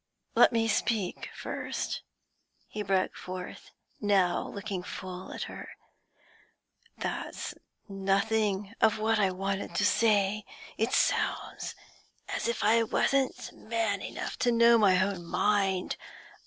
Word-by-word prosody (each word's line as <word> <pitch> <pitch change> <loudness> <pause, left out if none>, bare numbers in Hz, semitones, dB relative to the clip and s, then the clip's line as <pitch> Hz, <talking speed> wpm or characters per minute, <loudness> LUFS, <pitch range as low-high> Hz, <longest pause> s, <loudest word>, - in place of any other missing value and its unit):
'Let - - +6
me 225 -1 +2
speak 215 -3 0
first,' - - -4 0.7
he 215 - -5
broke 190 -2 +1
forth, 180 0 -7 0.3
now 195 -4 +2
looking 200 -2 -4
full 185 0 -7
at - - -4
her. - - -8 1.3
'That's - - -4 0.3
nothing 200 +1 0
of 220 -1 +4
what 220 0 +2
I 195 -2 +4
wanted 195 +1 -3
to 205 - +2
say; 210 -1 +3 0.3
it 225 +3 0
sounds - - 0 0.5
as - - -2
if 235 - -1
I 225 +2 +5
wasn't 265 +4 0
man 220 -3 -1
enough - - -5
to 245 - +3
know 235 0 +6
my 190 -4 +5
own 190 -2 0
mind. 195 +1 +1
205 Hz, 120 wpm, -29 LUFS, 190-220 Hz, 1.3 s, Let